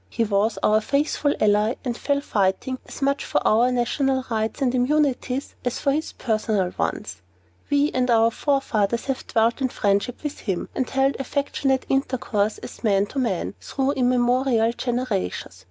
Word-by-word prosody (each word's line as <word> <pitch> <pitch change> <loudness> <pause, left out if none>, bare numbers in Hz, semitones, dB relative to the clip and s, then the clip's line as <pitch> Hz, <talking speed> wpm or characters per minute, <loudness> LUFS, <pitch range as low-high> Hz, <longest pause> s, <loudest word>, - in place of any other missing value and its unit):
He 230 - 0
was 210 +1 +1
our 215 +1 +4
faithful 285 +3 0
ally, 210 +3 +3
and 240 -2 -1
fell 280 +3 0
fighting 205 +3 0
as - - -7
much 280 +1 +1
for - - -1
our 235 +4 +4
national 260 +2 0
rights 220 +2 -1
and 260 -3 +1
immunities 265 0 0
as 245 - -1
for 280 - +1
his 310 +3 -2
own - - -34
personal 215 -5 +1
ones. 90 - -3 0.5
We 285 +1 +2
and 255 -1 0
our 230 -1 +4
forefathers 235 -6 0
have 270 -2 -3
dwelt 230 +2 +1
in 260 - +1
friendship 205 +4 0
with 295 -1 -4
him, 190 -5 -3
and 260 - -2
held 270 +1 +1
affectionate 270 0 -1
intercourse 240 -6 0
as - - -10
man 200 -3 +3
to 275 - -1
man, 215 -9 -1
through 270 0 -1
immemorial 250 -2 +2
generations. 240 - -3
245 Hz, 165 wpm, -23 LUFS, 220-270 Hz, 0.5 s, our